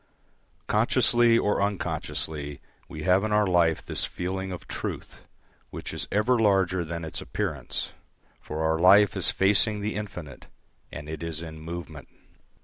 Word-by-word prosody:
Consciously 120 -1 +4
or 105 -3 +1
unconsciously 80 -7 -2 0.3
we 75 0 -7
have 95 +1 +3
in 110 - -1
our 105 0 +4
life 85 -3 +2
this - - -2
feeling 95 +1 -3
of 90 - -8
Truth - - -6 0.5
which - - -7
is - - -3
ever 115 +5 +2
larger 95 -4 +2
than 85 0 -5
its 80 - -4
appearance; - - -3 0.5
for 80 +1 -4
our 80 0 +1
life 100 +3 +6
is - - +1
facing 105 +2 +3
the 105 +1 -2
infinite, 90 -10 -7 0.4
and 75 +2 -8
it 80 -1 -6
is 85 -2 -3
in 80 -1 -8
movement. 85 0 -7
90 Hz, 145 wpm, -26 LUFS, 80-105 Hz, 0.5 s, life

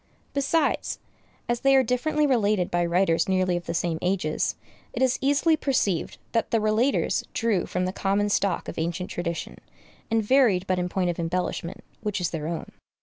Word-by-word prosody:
Besides, 285 +2 0 0.5
as 240 0 0
they 275 +1 +4
are 265 - +6
differently 295 +6 +1
related 210 -8 +2
by 175 0 +2
writers 170 0 +2
nearly 185 -1 +2
of 175 0 -5
the - - -2
same 165 -1 -1
ages, 180 -4 0 0.4
it 240 - -3
is 260 -1 +2
easily 285 +4 +3
perceived 255 - 0
that 230 - 0
the 230 - +2
relators 220 +5 +1
drew 225 -6 0
from 180 0 -1
the 185 - -2
common 200 +1 0
stock 200 -3 0
of - - -5
ancient 170 +3 -3
tradition, 170 -1 -4 0.5
and 225 -1 +2
varied 210 -6 +3
but 185 -1 0
in 180 0 -1
point 180 -1 0
of 170 - -8
embellishment, 170 +1 -3 0.2
which 210 -2 -2
is 175 -2 -1
their 155 -2 -3
own. 165 0 -5
195 Hz, 180 wpm, -25 LUFS, 175-240 Hz, 0.5 s, are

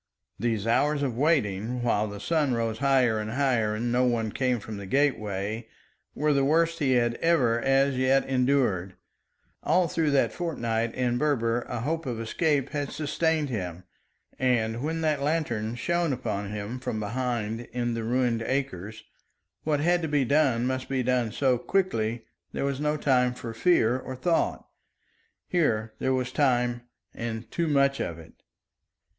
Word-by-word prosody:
These 110 -2 -1
hours 145 +5 +2
of 130 -5 -1
waiting, 120 - +1
while 110 -3 +1
the 100 -1 -7
sun 145 +2 +1
rose 115 -1 -2
higher 130 -5 +3
and 105 0 -4
higher 120 -4 +1
and 120 +2 -2
no 125 +1 +3
one 115 -3 +1
came 125 0 0
from 105 0 -7
the 100 -1 -7
gateway, 110 -4 0 0.5
were 150 0 +2
the 140 -1 +2
worst 165 +3 +2
he 135 -4 +2
had 120 -1 +2
ever 125 -9 +3
as 135 +1 +3
yet 130 +1 +3
endured. 125 -9 +1 0.7
All 180 -1 +2
through 160 -1 0
that 140 -1 +2
fortnight 115 -9 -2
in 120 -1 0
Berber 120 -5 +1
a 120 -2 -3
hope 160 +3 -2
of 120 -3 -3
escape 140 +4 0
had 145 -2 -3
sustained 155 0 0
him, 90 -6 -4 0.6
and 120 -3 +1
when 160 +3 -2
that 155 -3 +1
lantern 120 -8 -1
shone 170 +3 0
upon 105 -5 -3
him 105 +4 -5
from 110 -4 -3
behind 115 0 -2
in 120 0 -1
the 115 -1 -3
ruined 120 0 +1
acres, 110 -6 -3 0.6
what 150 -2 +1
had 175 +2 +2
to 160 - -1
be 145 -3 +1
done 130 -4 +2
must 130 0 -2
be 130 -2 0
done 125 -2 +1
so 130 0 +1
quickly 120 - -1 0.3
there - - -2
was 140 -1 -2
no 150 +1 0
time 125 -3 +2
for 115 -2 -6
fear 125 -4 +3
or 130 - -7
thought. 165 +6 0 0.8
Here 115 -11 0
there 130 - 0
was 125 -1 -2
time 125 -4 +1 0.3
and 115 -1 -5
too 170 -1 -1
much 140 -2 +2
of 85 - -3
it. 80 - -13
125 Hz, 165 wpm, -27 LUFS, 115-145 Hz, 0.8 s, higher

